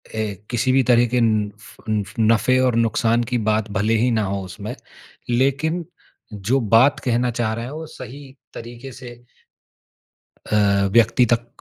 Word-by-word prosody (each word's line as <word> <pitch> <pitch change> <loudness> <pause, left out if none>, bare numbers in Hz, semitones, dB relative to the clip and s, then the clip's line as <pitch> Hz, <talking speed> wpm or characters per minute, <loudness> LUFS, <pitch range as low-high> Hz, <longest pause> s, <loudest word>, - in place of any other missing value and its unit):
ए 110 -2 -2 0.2
किसी 130 +1 0
भी 130 0 +3
तरह 120 0 +5
के 125 - +3
उँफ़ 105 -2 -2
ऊँफ़ 105 -2 -2
नफ़े 115 +3 +3
और 125 -2 +2
नुकसान 115 +1 +1
की 125 - +2
बात 110 0 0
भले 110 +3 +1
ही 120 +2 +2
ना 110 -2 +1
हो 100 0 -2
उसमें, 90 - -7 0.5
लेकिन 140 +7 0 0.5
जो 110 +7 0 0.2
बात 130 +5 +5
कहना 120 0 +1
चाह 115 -1 -1
रहा 115 +1 -5
है, 130 - -7
वो 160 +1 -6
सही 135 +1 -11 0.2
तरीक़े 120 +3 -9
से 120 -1 -10 1.4
अ, 100 -1 +3
व्यक्ति 115 +2 +4
तक 120 +1 0
115 Hz, 160 wpm, -21 LUFS, 110-130 Hz, 1.4 s, तरह